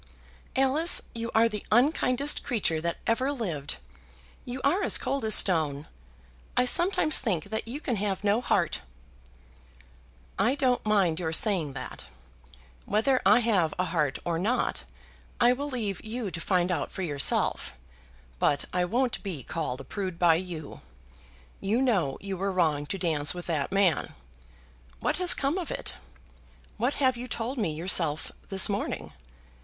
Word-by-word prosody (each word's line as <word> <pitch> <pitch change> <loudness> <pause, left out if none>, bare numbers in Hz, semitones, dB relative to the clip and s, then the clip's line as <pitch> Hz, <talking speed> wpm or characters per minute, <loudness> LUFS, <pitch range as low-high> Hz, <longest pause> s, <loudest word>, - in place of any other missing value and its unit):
"Alice, 275 +6 +3
you 230 0 -4
are 225 +1 +5
the 210 -3 -5
unkindest 260 +3 +2
creature 200 - -1
that 170 +1 -2
ever 255 +5 +1
lived. 170 - -4 0.7
You 250 +1 -5
are 350 +8 +2
as - - +5
cold 275 -2 -2
as 215 - +6
stone. 155 -5 +3 0.7
I 250 - +4
sometimes 345 +2 +4
think 195 - -1
that 220 +1 -3
you 260 +6 -4
can 245 -7 -2
have 200 0 -2
no 205 +3 +2
heart." 175 - 0 1.6
"I 250 +6 +3
don't 255 -3 +1
mind 190 -6 +2
your 165 -3 -2
saying 165 -5 0
that. 125 -1 -8 0.8
Whether 225 +6 +1
I 215 +5 +6
have 195 -9 +1
a 180 - 0
heart 150 -5 0
or 170 -1 -1
not 225 +8 -1 0.5
I 240 +1 +5
will 285 +3 -4
leave 215 -8 -3
you 220 -2 -4
to 165 0 -6
find 180 -1 +1
out 170 - -2
for 190 - -5
yourself; 145 - 0 0.7
but 145 - +1
I 180 0 +1
won't 245 +6 0
be 175 - -5
called 135 -5 -4
a - - -10
prude 185 +1 -5
by 175 -1 +5
you. 165 -3 -5 0.8
You 205 +5 0
know 195 - +1
you 195 -1 -5
were 195 +2 -1
wrong 155 -5 0
to 195 - -3
dance 160 -4 +1
with 175 - -7
that 155 -5 -2
man. 195 -4 +1 0.8
What - - -1
has 360 -1 +4
come 280 +7 -1
of 345 - -5
it? - - -4 0.8
What 245 +5 0
have 260 -3 +1
you 245 +1 -6
told 245 +2 -3
me 195 -8 0
yourself 160 -2 0 0.2
this 195 -2 +6
morning? 80 - -3
200 Hz, 160 wpm, -27 LUFS, 170-245 Hz, 1.6 s, as